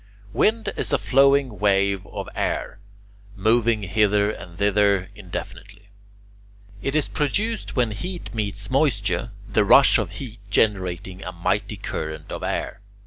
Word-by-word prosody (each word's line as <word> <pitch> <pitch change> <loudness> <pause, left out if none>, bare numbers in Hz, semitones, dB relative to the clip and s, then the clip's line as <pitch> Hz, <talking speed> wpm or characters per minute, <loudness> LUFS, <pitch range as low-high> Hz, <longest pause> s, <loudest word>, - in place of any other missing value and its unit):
Wind 225 +1 +1
is - - -1
a 145 - +3
flowing 135 -5 +3
wave 100 -1 +2
of - - -6
air, 100 - -2 0.6
moving 110 +1 +2
hither 105 +1 +2
and 85 -5 -10
thither 100 -1 +2
indefinitely. 100 +1 -9 0.9
It 135 +5 -2
is 155 - +2
produced 205 +10 -1
when 120 -4 +2
heat 175 - -6
meets 100 -1 -2
moisture, 120 -5 +1 0.2
the 110 -1 +2
rush 135 +5 +6
of 95 -5 -3
heat 115 0 -8
generating 95 -3 0
a 90 - -5
mighty 85 -1 -1
current 80 0 -5
of - - -5
air. 95 - -3
105 Hz, 135 wpm, -23 LUFS, 100-125 Hz, 0.9 s, rush